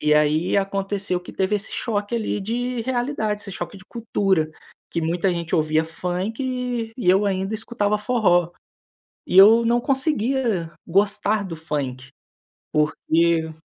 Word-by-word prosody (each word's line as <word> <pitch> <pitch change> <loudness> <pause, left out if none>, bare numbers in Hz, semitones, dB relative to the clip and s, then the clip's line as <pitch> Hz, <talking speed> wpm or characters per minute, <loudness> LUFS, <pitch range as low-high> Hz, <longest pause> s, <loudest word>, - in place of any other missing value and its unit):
E 150 0 +2
aí, 150 +5 +2
aconteceu 195 -1 -1
que 180 - -11
teve 190 +2 0
esse 210 +1 -1
choque 210 -1 -2
ali, 220 -2 -1
de 240 +4 -2
realidade, 240 -4 -1
esse 200 - -6
choque 175 +3 -6
de 190 - -16
cultura, 195 -8 0 0.4
que 170 - -2
muita 170 +4 0
gente 170 -1 -3
ouvia 155 0 +2
funk 225 +8 -3
e 205 -8 +2
eu 195 +2 +3
ainda 195 +1 -1
escutava 210 -2 -1
forró. 205 -7 +2 0.8
E 180 - -1
eu 220 +4 +8
não 235 +1 +2
conseguia 260 - 0
gostar 205 +3 +1
do 180 -4 -6
funk, 135 -5 -4 0.6
porque 160 +1 +1
200 Hz, 140 wpm, -22 LUFS, 170-225 Hz, 0.8 s, eu